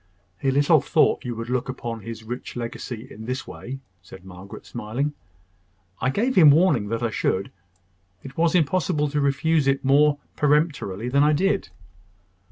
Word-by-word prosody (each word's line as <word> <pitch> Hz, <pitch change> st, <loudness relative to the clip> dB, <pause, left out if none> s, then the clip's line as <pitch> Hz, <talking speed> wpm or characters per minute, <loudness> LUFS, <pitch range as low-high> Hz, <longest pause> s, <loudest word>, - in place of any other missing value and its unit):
"He 135 Hz, -, 0 dB
little 145 Hz, +3 st, +4 dB
thought -, -, +2 dB
you 120 Hz, -1 st, -3 dB
would 115 Hz, +2 st, -5 dB
look 125 Hz, 0 st, -1 dB
upon 120 Hz, -3 st, -5 dB
his 115 Hz, 0 st, -8 dB
rich 120 Hz, +3 st, -7 dB
legacy 120 Hz, 0 st, -6 dB
in 110 Hz, +2 st, -9 dB
this 130 Hz, +2 st, -4 dB
way," 135 Hz, +2 st, -8 dB, 0.2 s
said 95 Hz, +1 st, -14 dB
Margaret, 95 Hz, +1 st, -11 dB
smiling. 120 Hz, +6 st, -3 dB, 0.9 s
"I 125 Hz, -, +1 dB
gave 230 Hz, -, 0 dB
him 165 Hz, -, +7 dB
warning 145 Hz, -, +4 dB
that 115 Hz, +2 st, -3 dB
I 115 Hz, -, 0 dB
should. 100 Hz, -2 st, -1 dB, 0.7 s
It 135 Hz, 0 st, -10 dB
was 165 Hz, +1 st, +2 dB
impossible 160 Hz, -2 st, +1 dB
to 145 Hz, +1 st, -1 dB
refuse 140 Hz, +2 st, +1 dB
it 135 Hz, 0 st, +1 dB
more 145 Hz, +2 st, +4 dB, 0.2 s
peremptorily 145 Hz, -, 0 dB
than 140 Hz, +3 st, +2 dB
I 150 Hz, +1 st, +4 dB
did." 195 Hz, +5 st, 0 dB
135 Hz, 165 wpm, -24 LUFS, 115-150 Hz, 0.9 s, him